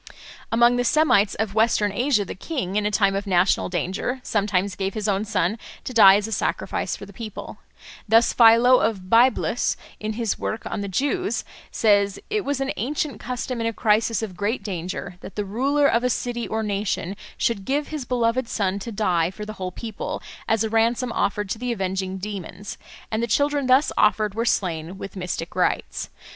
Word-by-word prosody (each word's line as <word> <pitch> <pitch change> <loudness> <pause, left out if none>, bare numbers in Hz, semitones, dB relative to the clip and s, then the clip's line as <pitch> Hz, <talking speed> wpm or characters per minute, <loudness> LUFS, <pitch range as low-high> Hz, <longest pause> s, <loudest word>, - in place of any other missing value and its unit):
Among 240 +2 +4
the 245 - +1
Semites 245 -8 +3
of 220 -2 -2
Western 220 -1 +2
Asia 240 -1 +1
the - - -6
king, 195 - -4
in 210 0 +1
a - - +1
time 200 -2 +2
of 200 +1 -3
national 180 0 +2
danger, 185 - -2
sometimes 200 -2 0
gave 195 0 -3
his 215 -1 -2
own 200 +1 0
son 210 0 0 0.2
to 255 - -6
die 195 -4 +8
as 205 +1 0
a - - -7
sacrifice - - -1
for - - -9
the - - -14
people. 220 -4 -8 0.5
Thus 225 +2 +5
Philo 235 +2 +6
of 190 -4 -2
Byblus, 240 +3 +3 0.2
in 215 +1 -3
his 225 -1 -2
work 220 - -3
on - - -3
the 200 - -3
Jews, 290 - -1 0.3
says: 200 -2 +2
"It 425 -1 0
was 285 -1 -1
an 270 0 -1
ancient 285 +5 -2
custom 250 -1 -4
in 230 - 0
a 230 - -1
crisis 225 +1 +1
of 195 -5 -5
great 205 +3 -2
danger 180 -2 -5
that - - -10
the 210 - -2
ruler 275 +8 +1
of 240 -3 +3
a 250 - +2
city 240 -1 -2
or 220 0 -2
nation 200 -2 -2 0.2
should 225 -4 0
give 285 +6 -1
his 305 -3 -4
beloved 240 0 0
son 200 -2 -1
to 230 +4 -6
die 180 -6 +1
for 210 +3 -8
the 215 - -6
whole 185 0 -3
people, 220 +2 -5 0.3
as 225 -1 +2
a 220 - -1
ransom 235 +2 +1
offered 205 -2 -1
to 220 - -3
the 250 0 -2
avenging 190 -2 -2
demons; 195 0 -7 0.3
and 220 0 0
the 235 - 0
children 285 +3 +1
thus 260 +4 +4
offered 210 -1 +3
were 230 +2 -1
slain 175 -4 -1
with 195 0 -8
mystic 180 -2 -4
rites. 180 - -1
215 Hz, 195 wpm, -23 LUFS, 195-240 Hz, 0.5 s, die